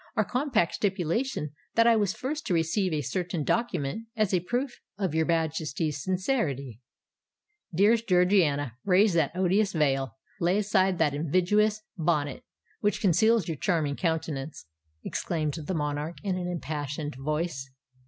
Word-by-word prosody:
"Our 215 Hz, -, +2 dB
compact 250 Hz, -, +1 dB
stipulated 190 Hz, -, -1 dB, 0.2 s
that 230 Hz, -, +5 dB
I 235 Hz, -1 st, +6 dB
was 205 Hz, -2 st, +1 dB
first 290 Hz, +7 st, -4 dB
to 180 Hz, -, +2 dB
receive 170 Hz, +4 st, +1 dB
a 155 Hz, -1 st, 0 dB
certain 175 Hz, +4 st, -2 dB
document, 220 Hz, -, -1 dB
as 215 Hz, -3 st, +1 dB
a 180 Hz, -, +4 dB
proof 245 Hz, +8 st, -3 dB, 0.2 s
of 190 Hz, -5 st, -1 dB
your 160 Hz, 0 st, +1 dB
Majesty's 160 Hz, -2 st, -1 dB
sincerity——" 175 Hz, -, -1 dB, 1.0 s
"Dearest 220 Hz, +5 st, +4 dB
Georgiana, 175 Hz, -, +3 dB
raise 195 Hz, +1 st, +4 dB
that 160 Hz, -5 st, +2 dB
odious 190 Hz, +2 st, +2 dB
veil—lay 150 Hz, +5 st, 0 dB
aside 195 Hz, -3 st, +2 dB
that 150 Hz, -4 st, +2 dB
invidious 185 Hz, +8 st, +2 dB, 0.2 s
bonnet, 150 Hz, -4 st, 0 dB, 0.4 s
which 205 Hz, -, 0 dB
conceals 210 Hz, +2 st, +3 dB
your 160 Hz, -3 st, -3 dB
charming 155 Hz, -4 st, 0 dB
countenance!" 160 Hz, -, -3 dB, 0.4 s
exclaimed 155 Hz, -4 st, -2 dB
the 165 Hz, +3 st, -4 dB
monarch, 150 Hz, +2 st, -2 dB
in 195 Hz, -3 st, 0 dB
an 180 Hz, -1 st, -3 dB
impassioned 150 Hz, -3 st, -4 dB
voice. 150 Hz, 0 st, -3 dB
175 Hz, 135 wpm, -28 LUFS, 150-205 Hz, 1.0 s, I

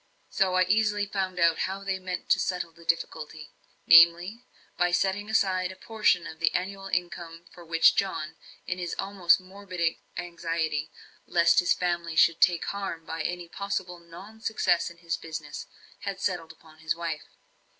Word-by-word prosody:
So 185 Hz, -1 st, +1 dB
I 185 Hz, -, +5 dB
easily 210 Hz, +2 st, +2 dB
found 190 Hz, -2 st, -3 dB
out 170 Hz, -1 st, +4 dB
how 195 Hz, +1 st, -5 dB
they 195 Hz, -1 st, -2 dB
meant 185 Hz, -1 st, -5 dB
to -, -, +5 dB
settle 180 Hz, -2 st, -2 dB
the 170 Hz, +1 st, -17 dB
difficulty; 155 Hz, -2 st, -3 dB, 0.3 s
namely, 170 Hz, +7 st, +6 dB, 0.3 s
by 175 Hz, 0 st, +2 dB
setting 195 Hz, +3 st, 0 dB
aside 185 Hz, -4 st, +1 dB
a -, -, -10 dB
portion 210 Hz, -4 st, +1 dB
of 160 Hz, -, -9 dB
the 165 Hz, -, +2 dB
annual 195 Hz, +1 st, -3 dB
income 175 Hz, -2 st, -4 dB
which 165 Hz, -1 st, +3 dB
John, 160 Hz, -5 st, -2 dB, 0.3 s
in 180 Hz, -, -3 dB
his 175 Hz, -2 st, -3 dB
almost 195 Hz, -3 st, +3 dB
morbid 185 Hz, -3 st, -3 dB, 0.2 s
anxiety 165 Hz, -3 st, -2 dB, 0.4 s
lest 170 Hz, +3 st, +4 dB
his 180 Hz, -, +3 dB
family 170 Hz, -2 st, -2 dB
should 165 Hz, +1 st, +4 dB
take 175 Hz, -2 st, +4 dB
harm 195 Hz, -5 st, -4 dB
by 165 Hz, 0 st, -4 dB
any 175 Hz, +2 st, -3 dB
possible 185 Hz, -1 st, -4 dB
non 190 Hz, +6 st, -13 dB
success 190 Hz, -6 st, +1 dB
in 170 Hz, -, -14 dB
his 170 Hz, -1 st, -3 dB
business, 155 Hz, -2 st, -7 dB, 0.3 s
had 195 Hz, -2 st, -5 dB
settled 175 Hz, -5 st, -2 dB
upon 160 Hz, -1 st, -19 dB
his 160 Hz, 0 st, -1 dB
wife. 165 Hz, -2 st, -4 dB
175 Hz, 160 wpm, -27 LUFS, 165-195 Hz, 0.4 s, namely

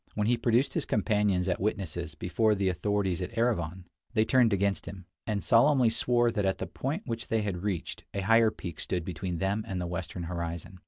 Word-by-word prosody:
When 105 Hz, -, 0 dB
he 120 Hz, +3 st, +3 dB
produced 120 Hz, +3 st, +2 dB
his -, -, -2 dB
companions 100 Hz, -2 st, +1 dB
as 90 Hz, -, 0 dB
witnesses 85 Hz, -5 st, -3 dB
before 105 Hz, +7 st, +1 dB
the 100 Hz, -1 st, +1 dB
authorities 95 Hz, 0 st, 0 dB
at 100 Hz, +6 st, -5 dB
Erivan, 95 Hz, -7 st, 0 dB, 0.3 s
they 110 Hz, 0 st, +4 dB
turned 120 Hz, -1 st, +4 dB
against 100 Hz, 0 st, 0 dB
him, 95 Hz, -2 st, -8 dB, 0.2 s
and 105 Hz, -4 st, -1 dB
solemnly 125 Hz, -, +5 dB
swore 120 Hz, +1 st, +2 dB
that 105 Hz, -, -1 dB
at 95 Hz, 0 st, +1 dB
the -, -, -3 dB
point 150 Hz, +10 st, -3 dB
which 115 Hz, -2 st, -4 dB
they 110 Hz, -1 st, 0 dB
had 95 Hz, -4 st, -3 dB
reached 95 Hz, -4 st, -3 dB
a 100 Hz, -, -3 dB
higher 115 Hz, +3 st, +5 dB
peak 85 Hz, -6 st, -8 dB
stood 90 Hz, -3 st, -2 dB
between 90 Hz, 0 st, -4 dB
them 100 Hz, +5 st, 0 dB
and 95 Hz, -2 st, -3 dB
the 90 Hz, -, -2 dB
western 85 Hz, 0 st, -4 dB
horizon. 85 Hz, +2 st, -5 dB
100 Hz, 205 wpm, -29 LUFS, 90-115 Hz, 0.3 s, solemnly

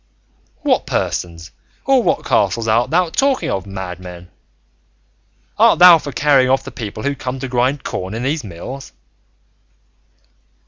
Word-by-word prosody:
"What -, -, +1 dB
persons 85 Hz, 0 st, -3 dB, 0.3 s
or 270 Hz, -2 st, +4 dB
what -, -, -1 dB
castle 110 Hz, +3 st, +1 dB
art 115 Hz, +2 st, +2 dB
thou 175 Hz, +1 st, +1 dB
talking 270 Hz, +4 st, 0 dB
of, 95 Hz, 0 st, -3 dB
madman? 90 Hz, -2 st, -8 dB, 1.3 s
Art -, -, +5 dB
thou 175 Hz, -1 st, +8 dB
for 145 Hz, -1 st, -7 dB
carrying 135 Hz, 0 st, +3 dB
off 135 Hz, +1 st, +2 dB
the -, -, -9 dB
people 110 Hz, -1 st, -7 dB
who 140 Hz, -, 0 dB
come 135 Hz, -1 st, -5 dB
to 135 Hz, -, -4 dB
grind 130 Hz, +3 st, 0 dB
corn 95 Hz, +3 st, -5 dB
in 115 Hz, -, -4 dB
these 145 Hz, +2 st, -1 dB
mills?" 115 Hz, +8 st, -9 dB
125 Hz, 140 wpm, -18 LUFS, 95-145 Hz, 1.3 s, thou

